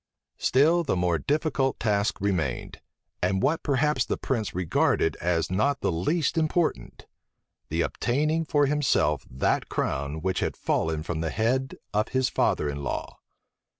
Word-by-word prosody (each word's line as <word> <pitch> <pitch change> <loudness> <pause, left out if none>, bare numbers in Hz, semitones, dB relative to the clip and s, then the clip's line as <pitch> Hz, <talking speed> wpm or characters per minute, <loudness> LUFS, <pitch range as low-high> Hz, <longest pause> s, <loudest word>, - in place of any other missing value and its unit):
Still 160 +6 +3
the 140 - 0
more 90 -2 +1
difficult 145 -3 0
task 105 -1 0
remained, 90 -10 -2 0.4
and 95 +2 +1
what 160 +5 +2
perhaps 145 -2 +1
the - - -2
prince 115 -8 -2
regarded 90 -3 +1
as 85 0 0
not 135 +10 +1
the - - +1
least 145 - 0
important: 155 - -1 0.6
the - - 0
obtaining 150 +6 0
for 145 -2 +2
himself 105 - +1
that 65 +2 0
crown 70 +4 -2
which 95 -1 0
had - - -2
fallen 80 -1 -1
from 80 -1 -3
the 80 - -1
head 130 - 0 0.2
of 105 +1 +1
his 130 -1 +1
father 75 - +1
in 70 0 -4
law. 70 - -4
110 Hz, 150 wpm, -26 LUFS, -, 0.6 s, Still